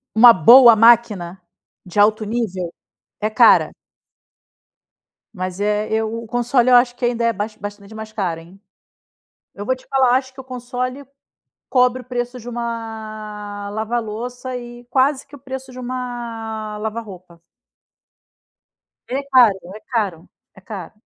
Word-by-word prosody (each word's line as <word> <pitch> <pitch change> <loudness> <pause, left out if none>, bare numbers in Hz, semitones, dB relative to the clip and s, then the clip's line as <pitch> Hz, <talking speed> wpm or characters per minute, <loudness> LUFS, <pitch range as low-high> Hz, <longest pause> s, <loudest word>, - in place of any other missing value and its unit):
Uma 235 +2 +9
boa 235 - +8
máquina 210 -6 +3 0.5
de 180 +3 -6
alto 215 +1 +4
nível 200 -6 -3 0.5
é 215 +1 -1
cara. 215 - +5 1.6
Mas 185 -1 -5
é, 210 +1 0
eu 220 0 -1
o - - -10
console, 245 +2 +1
eu 250 - +6
acho 245 0 +3
que 245 - -6
ainda 235 -1 -1
é 230 - +3
bas 215 +1 -5
bastante 205 0 -9
mais 220 0 -8
caro, 180 -6 -3
hein. 175 +4 -17 0.9
Eu 205 - -7
vou 260 - +1
te 255 - -20
falar, 260 -2 +3
acho 260 0 -3
que 265 - -10
o - - -11
console 255 +1 -5 0.6
cobre 250 0 +2
o - - -31
preço 245 0 -4
de 235 - -12
uma 215 -3 -6
lava-louça 235 +3 -4
e 240 0 -9
quase 265 +2 +1
que 285 - -14
o - - -14
preço 265 0 -8
de 255 - -10
uma 235 -4 -5
lava-roupa. 205 -6 -7 1.7
Ele 265 +2 -2
é - - -8
caro, 245 -6 +6 0.2
é 215 - -10
caro, 200 -10 -3 0.3
é - - -14
caro. 190 -3 -8
230 Hz, 150 wpm, -20 LUFS, 210-250 Hz, 1.7 s, Uma